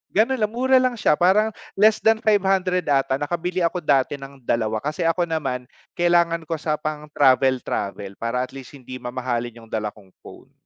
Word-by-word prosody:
Ganon 230 +6 +3
lang 215 0 0
mura 260 +3 +2
lang 255 -1 +3
siya 150 - +3
parang, 195 +7 +3 0.3
less 215 +1 +4
than 220 0 +4
500 190 -4 +2
ata 135 -1 +2
nakabili 175 +5 -2
ako 170 +2 0
dati 140 -3 +1
ng 135 -1 -12
2 110 -1 -1
kasi 150 +4 -2
ako 170 +2 +1
naman, 135 -6 -2 0.3
kailangan 170 -1 +2
ko 160 0 -4
sa 155 0 -1
pang 150 0 -5
travel-travel, 130 -7 +1
para 115 +2 -1
at 130 - -7
least 135 0 -11
hindi 130 -1 -9
mamahalin 120 -2 -4
yung 110 - -18
dala 105 -2 -2
kong 100 -3 -19
phone. - - -14
150 Hz, 180 wpm, -22 LUFS, 125-180 Hz, 0.3 s, less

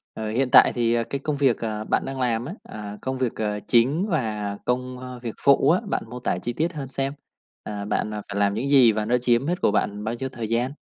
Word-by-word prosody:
ờ, 110 -1 -4
hiện 125 +4 +1
tại - - +8
thì, 120 -1 +1
ờ, 115 0 +1
cái 140 - -1
công 145 +2 -2
việc, 135 -4 +2
ờ, 110 -2 -3
bạn - - 0
đang 135 0 -5
làm 120 -2 0
á, 160 +8 -6
à, 105 -1 -8
công 130 0 -3
việc, 125 -3 -1
ờ, 105 -1 -2
chính 135 - +3
và 105 - -2
công, 125 +1 -2
ơ, 125 0 -8
việc 115 -3 -4
phụ 140 0 +5
á, 175 - +4
bạn - - 0
mô 125 0 -7
tả - - -1
chi 120 - -3
tiết 160 +8 -1
hơn 145 -5 -6
xem. 135 +1 -2 0.5
À, 105 -1 -5
bạn, 105 - -1
à, 105 - -4
phải 100 - -2
làm 100 0 +2
những 120 +6 -2
gì 130 -5 +7
và 105 0 -1
nó 120 +3 +2
chiếm 120 +1 +2
hết 175 +3 -1
của - - +3
bạn 105 0 -1
bao 110 +2 -2
nhiêu 130 +3 -4
thời 120 -4 -6
gian? 120 +4 0
120 Hz, 265 wpm, -24 LUFS, 110-135 Hz, 0.5 s, tại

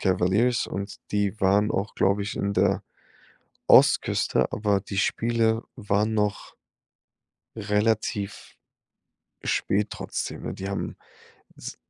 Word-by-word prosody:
Cavaliers 95 +6 +2
und 100 +1 -5 0.2
die 105 +1 0
waren 100 +2 +3
auch, 100 +2 -2
glaube 100 +1 +2
ich, 105 - -4
in 100 0 -1
der 100 +1 +2 0.8
Ostküste, - - +4
aber 105 -2 +1
die 100 0 -5
Spiele 115 +2 +1
waren 105 +2 0
noch 105 -2 -1 1.0
relativ 105 -1 -1 0.9
spät 105 +2 0
trotzdem, - - -5
ne? - - -4
Die 95 - -6
haben 100 - -4 0.6
s - - -8
105 Hz, 110 wpm, -25 LUFS, 100-110 Hz, 1.0 s, Ostküste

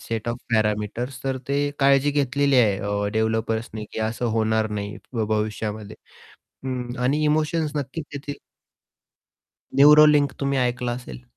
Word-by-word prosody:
Set 115 0 -4
of 120 - -2 0.2
parameters, 110 +4 -1
तर 135 -1 -1
ते 145 +1 0
काळजी 140 +1 +4
घेतलेली 140 -1 +1
आहे, 105 -5 +4
अ, 100 0 -2
डेव्हलपर्स 110 +1 -1
ने, 110 -1 -5
की - - -5
असं 110 +2 -2
होणार 110 0 +1
नाही 105 0 -4 0.2
भ 115 - -1
भविष्यामध्ये. 105 0 -3 0.7
हं. 125 -2 -4
आणि 140 +5 +1
इमोशन्स 155 0 0
नक्कीच 145 +2 -4
येतील. 145 0 -6 1.4
न्यूरोलिंक 150 0 +6
तुम्ही 140 -1 0
ऐकलं 125 -1 -1
असेल. 65 - -10
125 Hz, 135 wpm, -23 LUFS, 110-140 Hz, 1.4 s, न्यूरोलिंक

